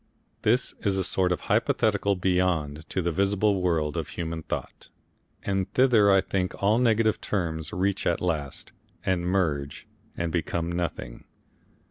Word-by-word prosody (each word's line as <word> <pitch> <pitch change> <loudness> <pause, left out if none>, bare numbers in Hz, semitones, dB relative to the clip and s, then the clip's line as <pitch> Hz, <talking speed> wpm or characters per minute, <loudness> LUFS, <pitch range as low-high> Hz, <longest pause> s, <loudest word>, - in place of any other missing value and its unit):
This 120 +4 +2
is 100 -2 0
a 95 - +1
sort 90 0 +2
of 90 - -1
hypothetical 100 -1 +1
Beyond 90 -5 0
to 95 - -1
the 85 - 0
visible 100 +2 +1
world 80 -5 0
of - - -2
human 80 -1 -5
thought, - - -6 0.5
and 95 -1 -1
thither 120 -6 +5
I 95 -1 +5
think 95 -1 -2
all 105 +4 +4
negative 115 -3 +2
terms 80 -5 -2
reach 95 +2 -1
at 85 - +1
last, 75 -6 -3 0.3
and 90 -2 0
merge 75 -7 -1 0.3
and 85 -1 -2
become 85 0 -2
nothing. 85 -9 -4
90 Hz, 145 wpm, -26 LUFS, 85-100 Hz, 0.5 s, thither